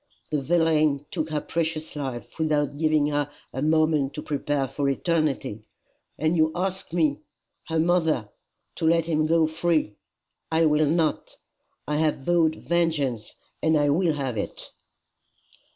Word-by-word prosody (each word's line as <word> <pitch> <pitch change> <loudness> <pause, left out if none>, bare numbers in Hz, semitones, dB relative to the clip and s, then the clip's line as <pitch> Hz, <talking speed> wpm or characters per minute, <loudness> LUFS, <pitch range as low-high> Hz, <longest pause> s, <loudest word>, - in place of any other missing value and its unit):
The 150 -2 0
villain 155 -2 +2
took 155 - -2
her 155 -1 -1
precious 160 -2 -3
life 135 -1 -6
without 150 -3 +1
giving 155 -1 +2
her 145 -1 -1 0.2
a 130 - -3
moment 155 -2 +2
to 150 - -5
prepare 145 -2 -1
for 140 +1 -1
eternity, 140 - -1 0.6
and 155 +3 +1
you 160 -1 +3
ask 190 0 -2
me 155 -4 +1 0.5
her 160 - -1
mother 160 -9 +1 0.5
to - - -2
let 165 0 +3
him 155 -2 +1
go 165 0 +4
free! 160 -6 0 0.6
I 160 +1 +3
will 150 0 +3
not. 160 -1 0 0.5
I 150 - 0
have 155 -3 0
vowed 165 -2 +3
vengeance, 150 -12 -1 0.3
and 160 0 +3
I 145 -1 +2
will 165 +1 +2
have 135 -6 -3
it." - - -5
155 Hz, 145 wpm, -25 LUFS, 145-165 Hz, 0.6 s, go